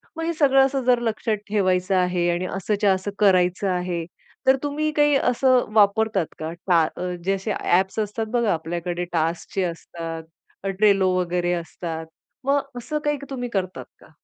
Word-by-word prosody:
मग 325 - -4
हे 335 - 0
सगळं 270 -4 +5
असं 270 -1 -1
जर 245 -1 +4
लक्षात 225 -1 -1
ठेवायचं 185 -2 +1
आहे 180 -1 +1
आणि 175 +1 0
असंच्या 205 +1 +1
असं 190 +2 -3
करायचं 185 -1 +3
आहे, 180 -2 -2 0.4
तर 265 - +7
तुम्ही 300 +1 -1
काही 295 -1 +3
असं 255 -1 +3
वापरतात 210 -2 +3
का? 160 +1 -4 0.2
टा 165 -4 +4 0.4
जे 195 - +2
असे 195 +2 -3
ॲप्स 190 +4 +1
असतात 215 +1 -2
बघा 235 -5 +2
आपल्याकडे 175 +2 -3
टास्कचे 165 +3 -1
असतात, 165 -1 -5 0.4
अ, 195 - -1
Trello 195 0 +3
वगैरे 175 0 0
असतात, 165 -1 -5 0.4
मग 280 +1 +3 0.2
असं 300 +5 -3
काही 295 0 +1
तुम्ही 245 -3 -4
करता 185 -4 -3 0.2
का? - - -18
195 Hz, 160 wpm, -23 LUFS, 175-245 Hz, 0.4 s, तर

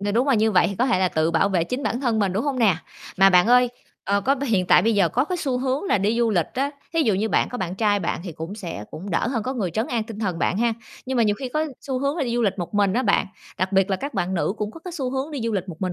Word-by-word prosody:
Ng 205 0 -1
đúng 255 +4 +2
là 270 - +4
như 220 0 +3
vậy 185 -4 +4
thì 200 - -4
có 250 +7 +1
thể 245 - +2
là 185 0 +2
tự 160 -1 +1
bảo 165 +4 +2
vệ 180 -4 +1
chính 250 +10 -4
bản 245 0 -1
thân 235 -5 +1
mình, 200 -3 +1
đúng 205 +7 -1
hông 275 -3 -1
nè? 205 -8 +4 0.4
Mà 195 0 +7
bạn 180 +2 +5
ơi, 250 +1 +5 0.4
ờ, 200 +1 +1
có 270 +6 +2
b 280 - -7
hiện 210 -9 +1
tại 175 - +6
bây 225 +2 +2
giờ 195 -4 +3
có 255 +10 +1
cái 360 +4 -3
xu 265 -6 -1
hướng 265 +5 -1
là 380 - +2
đi 210 +4 +1
du 235 -1 +2
lịch 175 -6 +1
á, 275 +2 0 0.2
thí 330 -1 +2
dụ 220 -8 +2
như 210 +4 0
bạn - - +2
có 245 - -6
bạn 180 -3 -3
trai 205 0 +2
bạn 170 - -2
thì 175 - -6
cũng 160 +5 -7
sẽ 170 - -6
cũng 195 +5 -7
đỡ 170 - 0
hơn 240 -4 -1
có 255 - -3
người 200 -8 -2
trấn 220 +8 -1
an 235 -2 -1
tinh 220 -2 -9
thần 185 -6 -2
bạn 185 - 0
ha. 235 0 +2 0.3
Nhưng 260 0 -2
mà 235 - +4
nhiều 210 -2 +2
khi 265 - -4
có 305 +5 -1
xu 265 -3 -3
hướng 280 +3 -1
là 320 - 0
đi 235 -2 -2
du 240 - +1
lịch 200 -2 0
một 175 +3 -5
mình 200 -2 +3
á 250 - +1
bạn, - - +2 0.3
đặc 185 +2 -1
biệt 195 +1 +3
là 190 - +1
các 280 +8 -6
bạn 185 +2 -1
nữ 180 - 0
cũng 210 -1 -3
có 330 - -12
cái 360 - -6
xu 265 -6 -3
hướng 270 +3 -3
đi 290 -4 -4
du 230 - -1
lịch 190 -2 -2
một 170 - -7
mình 185 -1 -1
215 Hz, 345 wpm, -23 LUFS, 190-255 Hz, 0.4 s, Mà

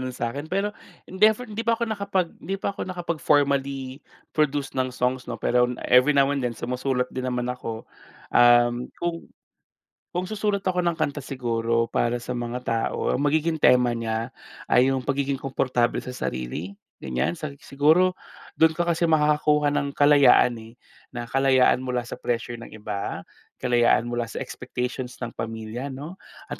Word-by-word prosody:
no'n 130 -1 -4
sa'kin. 140 +6 -4
Pero 195 +4 -1 0.4
never 215 +5 +3
hindi 215 +2 -4
pa 230 0 +2
ako 235 - -1
nakapag 200 -4 0
'di 195 +4 -3
pa 200 - -2
ako - - -6
nakapag 175 -3 -3
formally 140 -2 +1 0.3
produce 145 -3 0
ng 130 -1 0
songs 125 0 -1
'no 120 - -3
pero 125 +3 +3 0.2
every 125 +4 +6
now 135 -1 +5
and 140 -2 -2
then, 120 -2 -2
sumusulat 125 +1 -1
din 130 0 -3
naman 125 -1 -2
ako. 115 -3 -6 0.5
Um, 120 0 +5
kung, 170 -1 -3 0.8
kung 180 +1 -2
susulat 205 -1 -1
ako 180 -1 +1
ng 170 -1 0
kanta 145 -2 -1
siguro 115 -3 -1
para 120 +1 0
sa 125 +1 -5
mga 120 0 -3
tao, 115 0 0
ang - - -2
magiging 160 +2 +1
tema 125 -1 +5
niya 115 +1 -3 0.4
ay 125 +2 +4
yung 135 - 0
pagiging 140 -1 0
komportable 130 -3 0
sa 125 - -6
sarili, 80 - -4 0.2
ganyan. 65 -1 -1
Sa 155 -3 -5
siguro 160 +6 +3 0.4
do'n 160 0 +5
ka 175 - +1
kasi 170 0 +2
makakakuha 150 -1 +3
ng 140 -1 -1
kalayaan 145 -4 +6
eh, 110 +1 -13 0.4
na 120 - -3
kalayaan 130 -1 +4
mula 125 -1 -1
sa 120 - -8
pressure 120 0 -3
ng 115 - -11
iba, 105 -2 -5 0.4
kalayaan 120 -2 +3
mula 120 -1 -1
sa 110 - -6
expectations 125 0 -5
ng 120 -2 -4
pamilya 115 +3 -5
'no 145 +7 -8 0.3
at - - -5
130 Hz, 165 wpm, -25 LUFS, 120-155 Hz, 0.8 s, every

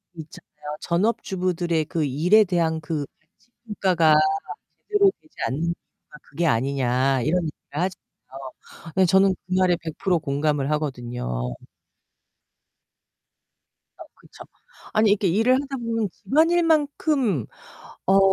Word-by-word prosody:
있잖아요. 150 -2 -10
전업주부들의 180 -3 -1
그 160 0 -2
일에 170 +11 +4
대한 170 -4 0
그 160 -2 -3 0.2
가치 205 +8 -36 0.2
평가가 180 -7 +3 0.7
제대로 410 -2 +4
되지 315 - -27
않는 140 +5 -3
이유가 170 -2 -7
그게 165 +4 -3
아니냐 130 0 +1
이런 175 +7 +1
얘기를 155 - -9
하잖아요. 135 -7 -7 0.4
네 190 -1 +5
저는 190 +2 +4
그 185 - -10
말에 180 -2 +3
100% 170 +2 -1
공감을 145 -1 -1
하거든요. 120 - -3 2.4
어 - - -10
그쵸. - - -15 0.5
아니 215 0 +4
이렇게 205 -1 +2
일을 225 +8 +3
하다보면 230 -6 -3
집안일만큼 300 - +1 0.6
어 195 +1 +5
170 Hz, 255 characters per minute, -23 LUFS, 150-210 Hz, 2.4 s, 네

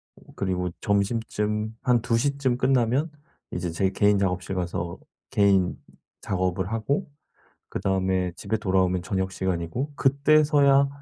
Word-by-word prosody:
오 - - -19
그리고 90 -2 -1
점심쯤 105 +1 -1
한 120 -2 +2
2 115 0 +1
시쯤 140 -1 0
끝나면 130 +4 +2 0.4
이제 90 -1 -3
제 95 +3 +1
개인 100 +1 +3
작업실 95 0 -1
가서 85 -1 -3 0.3
개인 100 -3 +3 0.4
작업을 95 +1 -1
하고 115 +7 -1 0.6
그다음에 95 -2 0
집에 110 - -2
돌아오면 95 -3 +1
저녁 95 0 -2
시간이고 95 - -2
그때서야 140 0 +4
100 Hz, 270 characters per minute, -25 LUFS, 95-125 Hz, 0.6 s, 그때서야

